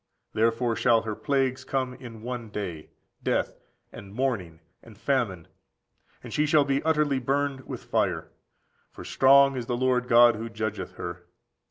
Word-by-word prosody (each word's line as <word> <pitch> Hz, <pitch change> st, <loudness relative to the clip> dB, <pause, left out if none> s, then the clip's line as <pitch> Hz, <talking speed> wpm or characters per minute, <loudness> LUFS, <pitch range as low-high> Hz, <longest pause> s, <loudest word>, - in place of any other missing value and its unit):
Therefore 115 Hz, +1 st, +1 dB
shall 115 Hz, -1 st, +3 dB
her 110 Hz, -1 st, -3 dB
plagues 130 Hz, +1 st, -1 dB
come 130 Hz, -1 st, -2 dB
in 115 Hz, -4 st, -11 dB
one 120 Hz, -2 st, -5 dB
day, 90 Hz, -7 st, -6 dB, 0.3 s
death, -, -, -1 dB, 0.3 s
and 100 Hz, 0 st, -11 dB
mourning, 105 Hz, -11 st, -2 dB, 0.2 s
and 110 Hz, -3 st, -16 dB
famine; 115 Hz, -, -1 dB, 0.8 s
and -, -, -8 dB
she 150 Hz, 0 st, +1 dB
shall 150 Hz, -2 st, +4 dB
be 140 Hz, 0 st, 0 dB
utterly 150 Hz, -4 st, +1 dB
burned 135 Hz, +1 st, -1 dB
with -, -, -7 dB
fire: -, -, -1 dB, 0.6 s
for -, -, -11 dB
strong 135 Hz, +1 st, +5 dB
is 120 Hz, -2 st, -4 dB
the 120 Hz, -, -1 dB
Lord 125 Hz, -1 st, +1 dB
God 120 Hz, -1 st, +6 dB
who 115 Hz, +1 st, -5 dB
judgeth 110 Hz, -1 st, -4 dB
her. -, -, -7 dB
125 Hz, 155 wpm, -26 LUFS, 110-135 Hz, 0.8 s, God